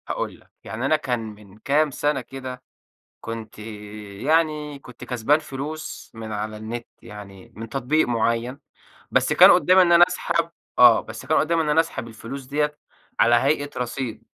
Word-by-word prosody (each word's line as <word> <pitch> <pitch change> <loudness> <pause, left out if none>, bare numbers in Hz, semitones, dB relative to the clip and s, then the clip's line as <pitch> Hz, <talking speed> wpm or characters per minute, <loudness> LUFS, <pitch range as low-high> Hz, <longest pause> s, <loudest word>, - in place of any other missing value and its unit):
هاقول - - -4
لك، - - -26
يعني 115 +4 -5
أنا 155 - +3
كان 130 -6 -2
من 105 -2 -11
كام 145 +6 +1
سنة 145 0 -1
كده 130 0 -8 0.6
كنت 115 -1 -7
يعني 110 +9 -2
كنت 125 -3 -12
كسبان 125 +4 +1
فلوس 155 +1 -7
من 110 -1 -7
على 105 +1 -4
النت، 115 +2 -6 0.2
يعني 105 +2 -12
من 115 +1 -7
تطبيق 135 +6 0
معيَّن، 115 +2 0 0.5
بس - - +2
كان - - +9
قُدَّامي 185 +1 +5
إن 175 -1 +4
أنا 170 0 +8
أسحب 170 -2 -1 0.3
آه، 120 -2 +8
بس 110 0 -10
كان 155 - +2
قُدَّامي 165 +1 +2
إن 155 - -1
أنا 150 +2 +3
أسحب 165 -7 -1
الفلوس 115 +4 -8
ديَّه 150 +2 -1 0.4
على 120 +1 +5
هيئة 145 +4 +1
رصيد، 125 -1 -4
125 Hz, 165 wpm, -23 LUFS, 110-150 Hz, 0.6 s, كان